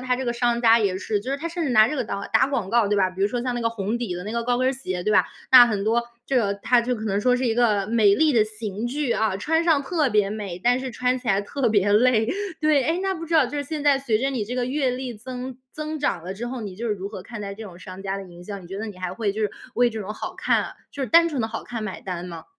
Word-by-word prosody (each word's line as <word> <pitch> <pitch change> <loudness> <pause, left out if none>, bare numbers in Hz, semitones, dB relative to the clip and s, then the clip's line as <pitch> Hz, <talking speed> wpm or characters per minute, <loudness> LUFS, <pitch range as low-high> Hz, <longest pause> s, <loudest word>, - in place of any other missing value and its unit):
它 250 0 0
这 260 - -3
个 240 - 0
商 240 0 0
家 230 0 +6
也 200 -4 0
是 205 +2 -2
就 255 - -5
是 275 - 0
它 305 +4 -5
甚 340 +1 -3
至 - - 0
拿 215 -2 +6
这 300 - -2
个 265 - -1
到 200 -1 -4
打 225 +4 +5
广 240 -9 -2
告， 230 -2 +3
对 205 - +1
吧？ 190 -2 +2
比 185 +1 -10
如 200 - +4
说 240 +2 -2
像 250 0 -2
那 240 - -2
个 230 - +1
红 225 0 -3
底 230 -7 -3
的 180 +1 -6
那 210 - -5
个 235 0 -1
高 245 0 +1
跟 255 +1 +1
儿 - - +1
鞋， 185 -9 -4
对 210 - +1
吧？ - - +4 0.3
那 250 -2 +10
很 210 -4 -1
多， 230 +2 +2 0.2
这 270 - 0
个， 205 -5 +2
它 240 +4 +2
就 250 +1 -1
可 220 -2 -6
能 200 -1 0
说 250 +3 +3
是 255 - -2
一 230 -2 +1
个 215 -5 +2
美 215 -3 +4
丽 310 +5 +3
的 225 -4 +4
刑 215 0 -5
具 275 +1 -2
啊， 215 -3 0
穿 320 +11 +1
上 315 -4 +3
特 305 -1 +1
别 210 -2 +3
美， 205 -5 -5
但 245 +2 +3
是 260 0 -4
穿 250 +1 0
起 250 - -14
来 195 -2 +3
特 245 +5 -1
别 205 -2 +2
累。 225 0 +4 0.3
对， 305 -3 +3
诶， 325 +5 0
那 385 +1 0
不 330 -2 -6
知 330 - -2
道 310 -3 +6
就 275 +4 -6
是 285 - -2
现 300 +1 -4
在 285 -2 +4
随 255 -5 0
着 270 +4 0
你 245 -6 -2
这 240 +4 -5
个 250 -1 0
阅 265 +1 0
历 250 0 -4
增 250 +3 -7 0.2
增 305 +1 -4
长 280 - -1
了 180 +2 -5
之 230 +5 -5
后， 250 0 -5
你 200 -4 -7
就 235 +4 -4
是 215 - 0
如 195 0 -6
何 205 -2 -8
看 230 +2 -8
待 200 -1 -5
这 220 +3 -8
种 185 -4 -10
商 185 0 -9
家 195 0 -3
的 195 - -6
营 175 -2 -13
销？ 200 +1 -6
你 180 - -12
觉 195 +2 -6
得 220 - -4
你 210 -3 -8
还 185 -1 -4
会 205 +1 -1
就 215 - -5
是 210 - 0 0.2
为 245 0 +3
这 220 -1 -5
种 210 +1 -5
好 - - -6
看 - - 0 0.2
就 280 - -4
是 260 - -2
单 335 0 +6
纯 280 -7 -2
的 220 - -1
好 225 - -6
看 230 -2 -5
买 215 -3 -5
单 180 -2 -5
吗？ 170 -2 -8
230 Hz, 345 characters per minute, -24 LUFS, 205-255 Hz, 0.3 s, 那